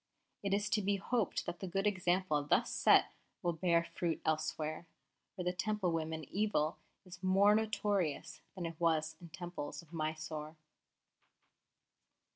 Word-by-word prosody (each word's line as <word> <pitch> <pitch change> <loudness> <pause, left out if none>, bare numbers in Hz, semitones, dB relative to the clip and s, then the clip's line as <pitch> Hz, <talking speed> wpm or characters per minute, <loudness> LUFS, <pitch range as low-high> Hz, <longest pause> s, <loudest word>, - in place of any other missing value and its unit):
It 200 - -2
is 205 +1 +2
to 215 - +3
be 200 +1 +2
hoped 215 +2 0
that 175 0 -4
the 190 - -4
good 195 +3 -1
example 180 -6 +2
thus 145 - +2
set - - +5 0.3
will 175 - +1
bear 170 0 +2
fruit 170 -1 -2
elsewhere, 155 +1 -1 0.5
where 180 -3 -4
the 180 - +1
Temple 200 -1 0
women 160 -1 -2
evil 195 -7 +1 0.3
is 175 -1 -11
more 195 +2 +5
notorious 205 -6 0
than 180 -3 -4
it 165 -1 -6
was 160 -1 +2
in 170 - -10
Temples 175 -4 -6
of 165 0 -20
Mysore." 155 -1 -3
175 Hz, 145 wpm, -35 LUFS, 155-195 Hz, 0.5 s, set